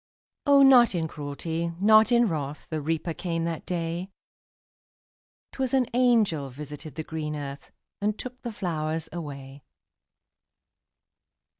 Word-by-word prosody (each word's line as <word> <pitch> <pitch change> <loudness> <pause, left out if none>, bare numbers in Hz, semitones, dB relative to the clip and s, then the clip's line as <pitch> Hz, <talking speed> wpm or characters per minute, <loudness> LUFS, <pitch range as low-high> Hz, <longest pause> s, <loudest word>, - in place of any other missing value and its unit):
O, 280 -1 +7
not 250 -6 +7
in 165 -2 0
cruelty, 160 +3 -4
not 215 +3 +6
in 240 -1 +5
wrath, 150 -4 -4
The 155 -1 -2
Reaper 160 +2 -1
came 165 -1 -2
that 165 -2 -4
day; 170 +1 -3 1.4
'Twas 265 -1 -1
an 260 -1 +3
angel 225 - +3
visited 145 +2 -9
the 160 - -4
green 155 -1 -4
earth, 140 -1 -7 0.3
And 210 +1 0
took 250 0 -8
the 240 - -4
flowers 160 -5 -3
away. 140 -4 -7
165 Hz, 125 wpm, -26 LUFS, 150-215 Hz, 1.4 s, O